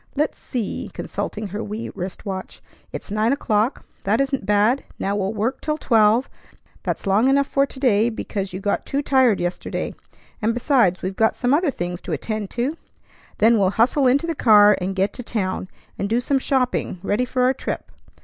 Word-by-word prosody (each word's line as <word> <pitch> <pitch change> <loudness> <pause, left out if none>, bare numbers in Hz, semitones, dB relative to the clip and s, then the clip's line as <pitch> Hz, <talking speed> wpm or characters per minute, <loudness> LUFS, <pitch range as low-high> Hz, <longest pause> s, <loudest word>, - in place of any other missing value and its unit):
Let's 300 +2 -1
see," 235 -6 -4
consulting 210 -1 -4
her 205 +4 -4
wee 215 +3 -5
wrist 180 +1 -6
watch, 190 -2 -5 0.3
"it's - - -7
nine 215 +3 +2
o'clock. 230 -3 0 0.2
That 210 +3 +1
isn't 270 -6 -1
bad. 210 +6 +3
Now 200 +1 -1
we'll 195 -1 -1
work 225 +6 -1
till 305 0 -1
twelve; 225 -2 +3 0.5
that's - - -3
long 200 +5 +3
enough 280 +1 +4
for 275 0 +1
to 265 - -9
day, 230 -4 +3
because 200 -3 -4
you 185 - -5
got 200 +1 -1
too 280 +1 -1
tired 260 -7 +3
yesterday; 175 0 -3 0.5
and, 225 +2 +1
besides, 240 - +2
we've 190 +1 -3
got 220 +2 +2
some 250 +1 +1
other 320 +2 +3
things 175 -7 -4
to 175 - -4
attend 210 +6 -3
to. 260 +7 -2 0.6
Then 225 +1 +4
we'll 190 -2 +3
hustle 260 +4 +3
into 275 +6 +3
the 335 - -1
car, 210 -7 +6
and 190 +1 -2
get 195 +1 +1
to - - -6
town, 190 -6 -3 0.3
and 200 - -1
do 230 +2 +2
some 270 +2 +1
shopping 255 -7 0
ready 205 +5 +1
for 250 0 0
our 255 +1 +4
trip. - - -5
225 Hz, 190 wpm, -22 LUFS, 200-260 Hz, 0.6 s, car